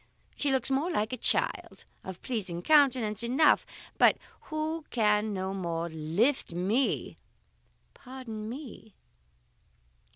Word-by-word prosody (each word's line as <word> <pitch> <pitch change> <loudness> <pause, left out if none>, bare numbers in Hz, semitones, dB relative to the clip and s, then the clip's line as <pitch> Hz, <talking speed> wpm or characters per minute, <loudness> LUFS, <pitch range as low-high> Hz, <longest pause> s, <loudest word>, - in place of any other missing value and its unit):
she 285 - 0
looks 265 0 +1
more 280 +6 +1
like 220 -9 -1
a - - -2
child, - - 0 0.2
of 190 -1 -8
pleasing 190 -8 -3
countenance 255 -8 +3
enough, 260 +6 +3 0.3
but - - +6 0.3
who 310 +1 -3
can 210 -2 +2
no 190 -1 -3
more 170 -3 -3
lift 170 - 0
me 205 +10 0 0.4
" - - -40
"Pardon 245 -5 -8
me!" 240 -5 -9
225 Hz, 120 wpm, -29 LUFS, 195-270 Hz, 0.4 s, but